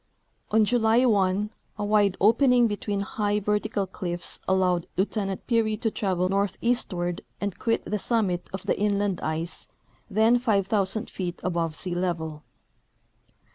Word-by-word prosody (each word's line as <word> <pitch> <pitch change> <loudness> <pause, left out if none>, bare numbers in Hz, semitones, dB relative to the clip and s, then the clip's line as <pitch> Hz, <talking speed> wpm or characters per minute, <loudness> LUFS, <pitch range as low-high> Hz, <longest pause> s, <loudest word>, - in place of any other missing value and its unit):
On 220 0 +4
July 235 +2 +3
1 205 -2 +2 0.3
a 205 - -2
wide 205 -2 +3
opening 245 +3 +5
between 205 -2 -2
high 205 +1 -1
vertical 210 0 0
cliffs 175 -2 -4
allowed 185 -2 +2
Lieutenant 195 0 -1
Peary 225 -3 +1
to 225 +1 -1
travel 185 -4 0
northeastward 195 -2 0 0.2
and 200 -2 -3
quit 230 -2 0
the 210 - -2
summit 195 -6 0
of 190 -1 -6
the - - 0
inland 205 -2 0
ice, 160 +2 -3 0.4
then 220 +4 +4
5,000 205 -2 +1
feet 180 -2 -5
above 170 -3 -1
sea 180 +1 -3
level. 165 -4 -2
200 Hz, 135 wpm, -26 LUFS, 185-220 Hz, 0.4 s, opening